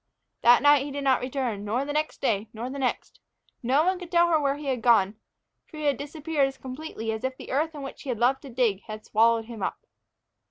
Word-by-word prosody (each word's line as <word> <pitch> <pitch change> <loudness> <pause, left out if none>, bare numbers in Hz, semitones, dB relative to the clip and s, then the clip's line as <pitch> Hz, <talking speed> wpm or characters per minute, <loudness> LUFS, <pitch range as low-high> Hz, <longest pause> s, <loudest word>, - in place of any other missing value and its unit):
That 240 +3 +6
night 290 -1 +6
he 290 - -5
did 285 0 -4
not 265 -2 +3
return, 250 -5 -3
nor 235 +6 -1
the 290 - -4
next 305 +1 -2
day, 215 -4 0
nor 235 +3 -5
the 280 - -6
next. 255 -2 -2 0.4
No 265 +5 +3
one 370 +1 +1
could 355 -2 -9
tell 345 -1 +4
her 320 -2 +4
where 280 -1 +1
he 295 +1 -9
had 260 -4 -1
gone. 220 -4 +4 0.5
For 310 - -12
he 305 - -5
had 285 -3 +2
disappeared 295 0 -1
as 270 0 -8
completely 255 -4 -5
as 220 +2 -5
if 260 0 -2
the - - -9
earth 310 +4 0
in 285 - -7
which 270 - -8
he 280 - -8
had 245 - -1
loved 255 +4 +2
to 275 - -10
dig 230 -5 +1
had 215 0 -8
swallowed 225 +1 +3
him 230 -2 -9
up. - - -4
265 Hz, 245 wpm, -26 LUFS, 230-290 Hz, 0.5 s, That